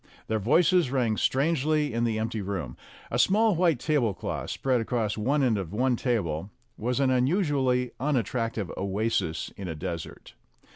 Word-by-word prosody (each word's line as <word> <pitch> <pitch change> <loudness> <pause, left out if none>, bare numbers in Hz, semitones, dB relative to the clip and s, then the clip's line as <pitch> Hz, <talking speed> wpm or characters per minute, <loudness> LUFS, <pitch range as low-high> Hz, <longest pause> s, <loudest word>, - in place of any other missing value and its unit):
Their 110 0 -1
voices 165 - +3
rang 125 -5 +1
strangely 150 +2 +1
in 115 +1 +1
the 115 -2 0
empty 110 0 -2
room. 95 -11 -4 0.4
A - - 0
small 215 +1 +4
white 165 -6 +2
tablecloth, 120 - -1
spread 130 -3 0
across 115 -2 -1
one 135 +7 +1
end 115 -5 +2
of 95 -1 -6
one 125 +3 +2
table, 100 - -1 0.3
was 125 +4 -2
an 135 -2 +3
unusually 130 -3 +1
unattrac 125 -4 0
tive 100 -5 -4
oasis 100 -3 -1
in 95 - -6
a 80 - -4
desert. 85 +2 -6
120 Hz, 155 wpm, -27 LUFS, 105-140 Hz, 0.4 s, small